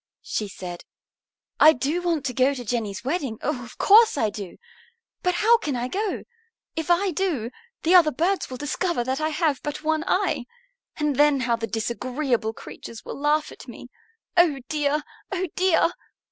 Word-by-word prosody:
she 210 Hz, -, -2 dB
said, 180 Hz, -3 st, -8 dB, 0.8 s
"I 315 Hz, -, +8 dB
do 290 Hz, +7 st, -1 dB
want 335 Hz, -5 st, -1 dB
to 250 Hz, -, -1 dB
go 260 Hz, +3 st, +3 dB
to 245 Hz, -2 st, -7 dB
Jenny's 215 Hz, -3 st, -2 dB
wedding, 270 Hz, -6 st, -2 dB
oh, 275 Hz, -4 st, -2 dB
of 240 Hz, +1 st, -12 dB
course 440 Hz, -3 st, +6 dB
I 220 Hz, -5 st, +1 dB
do! 200 Hz, -3 st, -8 dB, 0.6 s
But 360 Hz, -1 st, +1 dB
how 460 Hz, +5 st, +5 dB
can 295 Hz, -, -2 dB
I 245 Hz, 0 st, -2 dB
go? 410 Hz, +4 st, -2 dB, 0.5 s
If 320 Hz, +1 st, -3 dB
I 365 Hz, +2 st, +3 dB
do, 300 Hz, -, -1 dB, 0.3 s
the 335 Hz, -, +3 dB
other 345 Hz, -4 st, +7 dB
birds 345 Hz, +8 st, 0 dB
will 255 Hz, -, -6 dB
discover 295 Hz, 0 st, -1 dB
that 260 Hz, +4 st, -2 dB
I 310 Hz, -, +1 dB
have 310 Hz, -3 st, 0 dB
but 295 Hz, +1 st, -5 dB
one 315 Hz, 0 st, +1 dB
eye, 370 Hz, -11 st, +1 dB, 0.5 s
and 300 Hz, -3 st, 0 dB
then 290 Hz, -2 st, +4 dB
how 235 Hz, -2 st, +1 dB
the 225 Hz, -1 st, -4 dB
disagreeable 240 Hz, +1 st, -1 dB
creatures 225 Hz, 0 st, -10 dB
will -, -, -7 dB
laugh 300 Hz, +1 st, +1 dB
at -, -, -12 dB
me. -, -, -10 dB, 0.5 s
Oh 330 Hz, -6 st, +4 dB
dear, 295 Hz, 0 st, 0 dB, 0.3 s
oh 375 Hz, -1 st, -1 dB
dear! 365 Hz, -2 st, +3 dB
295 Hz, 175 wpm, -24 LUFS, 245-345 Hz, 0.8 s, I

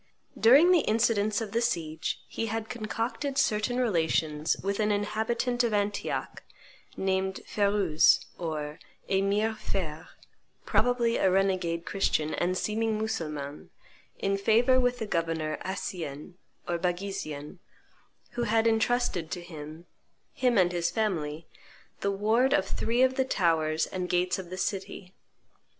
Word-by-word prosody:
During 280 Hz, +10 st, +6 dB
the 360 Hz, -, +6 dB
incidents 215 Hz, -3 st, +1 dB
of 215 Hz, -3 st, -5 dB
the 230 Hz, -, +1 dB
siege 165 Hz, -9 st, -2 dB
he 225 Hz, -, -3 dB
had 225 Hz, 0 st, -3 dB
concocted 240 Hz, +4 st, -3 dB
certain 215 Hz, +2 st, +1 dB
relations 160 Hz, -8 st, +1 dB
with 200 Hz, +1 st, -1 dB
an 210 Hz, -1 st, +2 dB
inhabitant 220 Hz, +4 st, 0 dB
of 230 Hz, -3 st, +1 dB
Antioch, 205 Hz, 0 st, -2 dB, 0.6 s
named 190 Hz, 0 st, -1 dB
Ferouz 200 Hz, -6 st, +3 dB
or 155 Hz, -3 st, -4 dB, 0.3 s
Emir 200 Hz, +3 st, +1 dB
Feir, 160 Hz, -7 st, -4 dB, 0.6 s
probably 240 Hz, -1 st, +2 dB
a 190 Hz, -, +3 dB
renegade 185 Hz, -3 st, +1 dB
Christian 155 Hz, -6 st, 0 dB
and 180 Hz, +1 st, 0 dB
seeming 220 Hz, +1 st, 0 dB
Mussulman, 150 Hz, -10 st, -4 dB, 0.5 s
in 195 Hz, 0 st, 0 dB
favor 235 Hz, +5 st, +4 dB
with 245 Hz, -1 st, +1 dB
the 220 Hz, -, -3 dB
Governor 165 Hz, -4 st, -1 dB
Accien 175 Hz, -5 st, -5 dB, 0.3 s
or 175 Hz, -1 st, -1 dB
Baghisian, 175 Hz, -4 st, -4 dB, 0.7 s
who 240 Hz, 0 st, -2 dB
had 225 Hz, 0 st, +2 dB
intrusted 225 Hz, -6 st, +1 dB
to 175 Hz, -, -4 dB
him, 160 Hz, -1 st, -9 dB, 0.5 s
him 250 Hz, -3 st, +2 dB
and 180 Hz, -2 st, +4 dB
his 170 Hz, -1 st, 0 dB
family, 165 Hz, -8 st, -2 dB, 0.5 s
the 200 Hz, -, 0 dB
ward 220 Hz, +7 st, +2 dB
of 295 Hz, -, +3 dB
three 235 Hz, +3 st, +1 dB
of 260 Hz, 0 st, +2 dB
the 265 Hz, -, +3 dB
towers 160 Hz, -7 st, +1 dB
and 180 Hz, -1 st, -4 dB
gates 180 Hz, +1 st, +1 dB
of 180 Hz, -2 st, -8 dB
the 185 Hz, -, -6 dB
city. 190 Hz, -1 st, -4 dB
195 Hz, 135 wpm, -28 LUFS, 170-225 Hz, 0.7 s, During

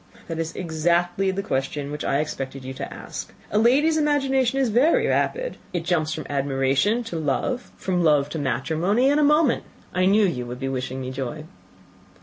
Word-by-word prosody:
"That 165 Hz, -1 st, -4 dB
is 165 Hz, 0 st, -3 dB
exactly 175 Hz, +3 st, +1 dB
the 195 Hz, +1 st, -2 dB
question 140 Hz, 0 st, -2 dB
which 150 Hz, 0 st, -4 dB
I 140 Hz, -, +1 dB
expected 135 Hz, -3 st, -5 dB
you 130 Hz, -, -5 dB
to 140 Hz, +1 st, -6 dB
ask. -, -, -7 dB, 0.2 s
A 210 Hz, -, +3 dB
lady's 285 Hz, +8 st, +4 dB
imagination 270 Hz, -4 st, +2 dB
is 265 Hz, -3 st, +2 dB
very 310 Hz, -, +3 dB
rapid; -, -, 0 dB, 0.2 s
it 170 Hz, -2 st, -2 dB
jumps 160 Hz, -3 st, +1 dB
from 155 Hz, -1 st, -4 dB
admiration 140 Hz, -, +1 dB
to 200 Hz, -7 st, -5 dB
love, 160 Hz, -, -1 dB
from 180 Hz, -2 st, 0 dB
love 150 Hz, -3 st, +4 dB
to 160 Hz, -, -4 dB
matrimony, 170 Hz, -, +1 dB
in 290 Hz, -, +3 dB
a -, -, +4 dB
moment. 300 Hz, -2 st, +3 dB, 0.3 s
I 185 Hz, 0 st, +2 dB
knew 205 Hz, +2 st, +5 dB
you 125 Hz, -10 st, -2 dB
would 125 Hz, +1 st, -6 dB
be 135 Hz, 0 st, -2 dB
wishing 130 Hz, 0 st, -3 dB
me 130 Hz, 0 st, -4 dB
joy." 135 Hz, +3 st, -5 dB
170 Hz, 185 wpm, -24 LUFS, -, 0.3 s, knew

